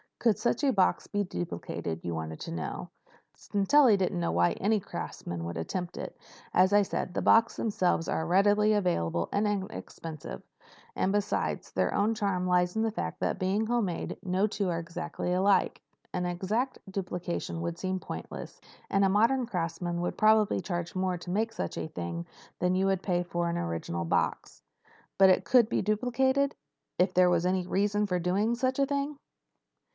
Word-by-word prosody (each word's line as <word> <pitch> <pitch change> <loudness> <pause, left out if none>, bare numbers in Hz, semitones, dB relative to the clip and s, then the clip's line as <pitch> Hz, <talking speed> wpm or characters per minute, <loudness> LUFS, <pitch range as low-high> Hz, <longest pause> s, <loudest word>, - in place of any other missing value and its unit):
"Could 230 -4 +2
such 235 +2 0
a 275 - +4
box 190 -3 +2
be 205 0 0
duplicated, 85 - -5
you 85 - -3
wanted 80 0 -5
to - - -5
know. 80 -1 -5 0.5
Sintelli 210 +3 +4
doesn't 185 - 0
know 85 -1 0
why 85 +1 +3
any 215 +2 +1
craftsman 85 - -6
would 85 0 -4
attempt 175 - -4
it. - - -6 0.4
As 185 +2 +4
I 205 0 +6
said, 185 - -3
the - - -1
boxes 225 +1 +5
themselves 180 -6 +1
are 160 - -1
readily 205 +4 +4
available 85 - 0
and 205 +1 +1
inexpensive. 190 -6 -5 0.5
And, 190 - +1
besides, 205 0 -1
their - - 0
only 210 +3 +2
charm 195 -4 0
lies 180 +1 +2
in 220 - +1
the 225 - +1
fact - - -4
that, - - -1
being 195 +3 +1
handmade, 220 -8 -1
no 185 +2 +1
two 205 -2 -1
were 170 -2 0
exactly 170 +1 -4
alike. 195 +2 +2 0.3
An 180 0 -1
exact 210 +9 -1
duplication 180 -3 -4
would 170 0 -3
seem 185 0 -2
pointless. 80 - -7 0.3
And 195 - +3
a - - +3
modern 230 +5 +3
craftsman 170 -2 -2
would 175 - -3
probably 215 -2 +4
charge 175 -1 -4
more 185 -1 0
to 175 +1 -7
make 220 +4 0
such 225 - -4
a - - -3
thing 85 - -5 0.3
than 180 0 +2
you 190 +1 +2
would 190 -1 +1
pay 175 -2 +1
for 175 0 -2
an 170 - -1
original 85 - -3
box." - - -1 0.6
"But 190 -1 +8
it - - +2
could 245 -4 +5
be - - +1
duplicated—if 250 -2 0
there 180 0 +5
was 175 0 +2
any 185 -1 0
reason 205 +2 +1
for 180 -2 0
doing 195 +6 +1
such 255 +2 0
a 275 - +3
thing?" 280 +1 -2
185 Hz, 175 wpm, -29 LUFS, 175-210 Hz, 0.6 s, But